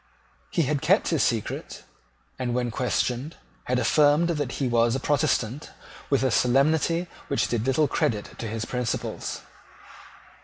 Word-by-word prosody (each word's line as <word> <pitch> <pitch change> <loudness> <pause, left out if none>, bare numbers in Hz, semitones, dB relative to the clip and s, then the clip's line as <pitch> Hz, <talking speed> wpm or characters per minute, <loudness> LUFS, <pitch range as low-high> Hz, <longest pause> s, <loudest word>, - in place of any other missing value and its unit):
He 170 - +1
had 145 0 -1
kept 185 +7 +3
his 165 -4 +1
secret, 115 -4 -2 0.6
and, 120 -2 -1
when 120 -1 -1
questioned, 125 +4 -1 0.3
had 125 - 0
affirmed 150 +5 +4
that 145 -6 -2
he 135 - -1
was 120 0 +2
a - - -1
Protestant 135 -2 0 0.4
with 140 -2 +2
a 130 - +2
solemnity 155 +8 +2 0.2
which 140 - +1
did 120 0 -1
little 145 +3 +3
credit 105 -5 -2
to 115 - -4
his 110 +1 -3
principles. 125 -1 -3
130 Hz, 145 wpm, -25 LUFS, 120-150 Hz, 0.6 s, affirmed